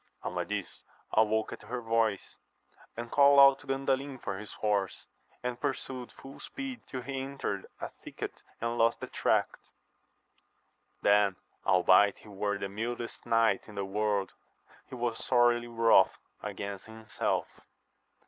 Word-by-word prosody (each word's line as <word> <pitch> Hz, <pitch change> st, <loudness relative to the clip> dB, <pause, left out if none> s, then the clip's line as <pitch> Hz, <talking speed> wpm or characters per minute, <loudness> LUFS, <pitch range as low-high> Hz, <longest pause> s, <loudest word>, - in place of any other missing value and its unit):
Amadis -, -, -4 dB, 0.3 s
awoke 110 Hz, 0 st, +2 dB
at -, -, -9 dB
her 120 Hz, +4 st, -5 dB
voice, 115 Hz, -3 st, 0 dB, 0.6 s
and 120 Hz, 0 st, -5 dB
called 140 Hz, -1 st, +7 dB
to 145 Hz, -, -16 dB
Gandalin 135 Hz, 0 st, -1 dB
for 95 Hz, -4 st, -4 dB
his 105 Hz, -, -9 dB
horse, 100 Hz, -3 st, -1 dB, 0.4 s
and 125 Hz, -1 st, -3 dB
pursued 130 Hz, -3 st, -3 dB
full 135 Hz, +1 st, -12 dB
speed 270 Hz, -2 st, -6 dB
till 130 Hz, -2 st, -5 dB
he 135 Hz, +1 st, -3 dB
entered 135 Hz, -8 st, -4 dB
a -, -, -4 dB
thicket -, -, -6 dB, 0.3 s
and 115 Hz, +1 st, -2 dB
lost 115 Hz, +1 st, +3 dB
the -, -, -4 dB
track. -, -, +2 dB, 1.6 s
Then 100 Hz, -1 st, +4 dB, 0.3 s
albeit 95 Hz, +3 st, +5 dB
he -, -, -15 dB
were 100 Hz, 0 st, -1 dB
the 100 Hz, -, -3 dB
mildest 115 Hz, +4 st, -5 dB
knight 115 Hz, -4 st, +3 dB
in 105 Hz, -, -11 dB
the 100 Hz, -, -2 dB
world; 100 Hz, 0 st, 0 dB, 0.6 s
he -, -, -7 dB
was 120 Hz, -2 st, -2 dB
sorely 120 Hz, -1 st, +3 dB
wroth 115 Hz, -1 st, +4 dB, 0.2 s
against 100 Hz, 0 st, -6 dB
himself. 110 Hz, -1 st, -2 dB
115 Hz, 135 wpm, -30 LUFS, 105-130 Hz, 1.6 s, called